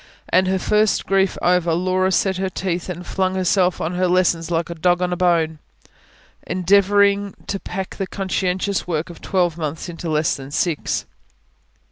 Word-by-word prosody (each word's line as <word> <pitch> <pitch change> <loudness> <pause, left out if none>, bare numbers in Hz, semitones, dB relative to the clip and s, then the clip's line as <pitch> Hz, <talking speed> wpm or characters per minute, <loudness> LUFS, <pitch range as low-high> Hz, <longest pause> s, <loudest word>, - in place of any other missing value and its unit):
And 185 +1 +3
her 190 0 +1
first 210 +3 +1
grief 195 -1 +1
over, 175 -2 +2
Laura 185 +2 +1
set 190 0 +1
her 190 0 -1
teeth 180 -1 -3
and 180 0 -6
flung 185 0 -1
herself 185 -1 +2
on 165 - -2
her 180 +1 +1
lessons 175 -2 +2
like 170 0 -1
a - - -2
dog 175 +2 +2
on 180 0 0
a - - 0
bone, 165 -3 +1 0.9
endeavouring 200 +2 +3
to 195 - -3
pack 190 0 -6
the 195 - -2
conscientious 190 0 -1
work 165 0 -2
of 170 - -14
twelve 175 -3 0
months 155 +2 -4
into 170 0 -6
less 155 0 +1
than 135 0 -9
six. 155 +1 -1
180 Hz, 170 wpm, -21 LUFS, 170-190 Hz, 0.9 s, And